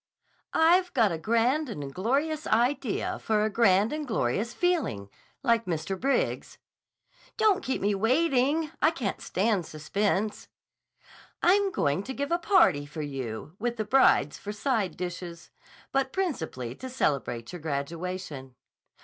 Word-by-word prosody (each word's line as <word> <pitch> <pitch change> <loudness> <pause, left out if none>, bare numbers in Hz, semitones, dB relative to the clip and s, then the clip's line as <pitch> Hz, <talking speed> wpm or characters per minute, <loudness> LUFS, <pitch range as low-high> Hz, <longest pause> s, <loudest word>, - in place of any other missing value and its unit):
"I've 355 +3 +4
got 225 -6 +4
a 165 - -3
grand 240 - +1
and 145 -10 -6
glorious 285 - -1
idea 240 0 0
for 215 -1 +1
a 215 - -1
grand 205 +1 +3
and 305 -1 -4
glorious 220 - 0
feeling—like 235 - -1
Mr. 175 +2 -2
Briggs's." 275 - -1 0.8
"Don't 420 -3 +3
keep 260 - -2
me 205 +1 +2
waiting. 275 +7 +2
I 310 - +6
can't 255 -11 -3
stand 195 -3 0
suspense." 200 +6 -1 1.0
"I'm 395 +2 +4
going 145 - 0
to 265 +5 -6
give 285 +3 -3
a 340 - +2
party 190 - +4
for 155 +1 -6
you, 135 +1 -6
with 240 +2 -2
the 215 - -2
brides 230 - +4
for 205 - -5
side 215 -3 -1
dishes, 175 -1 -6 0.4
but 270 -1 0
principally 160 - -3
to 260 - -8
celebrate 135 - -1
your 175 - -7
graduation." 155 -2 -5
215 Hz, 135 wpm, -28 LUFS, 165-275 Hz, 1.0 s, I